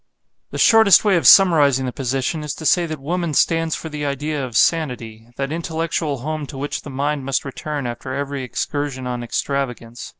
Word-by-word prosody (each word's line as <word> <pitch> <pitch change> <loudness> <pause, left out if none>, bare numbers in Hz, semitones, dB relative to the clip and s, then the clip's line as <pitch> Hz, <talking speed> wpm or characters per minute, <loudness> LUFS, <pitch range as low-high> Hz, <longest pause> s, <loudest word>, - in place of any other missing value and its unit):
The - - -7
shortest 220 -4 +6
way 200 -2 +4
of 165 -8 +2
summarizing 145 -9 +6
the 125 - -3
position 135 +5 -2
is 150 - -4
to 160 - -9
say 170 +3 +3
that 155 -2 -6
woman 165 +2 -2
stands 165 +1 +2
for - - -7
the 150 -1 -6
idea 145 +1 -2
of 120 -4 -3
Sanity; 120 -9 0
that 135 +1 -3
intellectual 160 -4 -3
home 155 +1 -4
to 135 - -9
which 145 +2 -4
the - - -10
mind 140 +1 -2
must 135 +1 -1
return 145 +1 -5
after 120 +2 -6
every 140 0 -3
excursion 130 +1 -4
on 125 -1 -3
extravagance. 120 -1 -4
145 Hz, 190 wpm, -20 LUFS, 130-160 Hz, -, shortest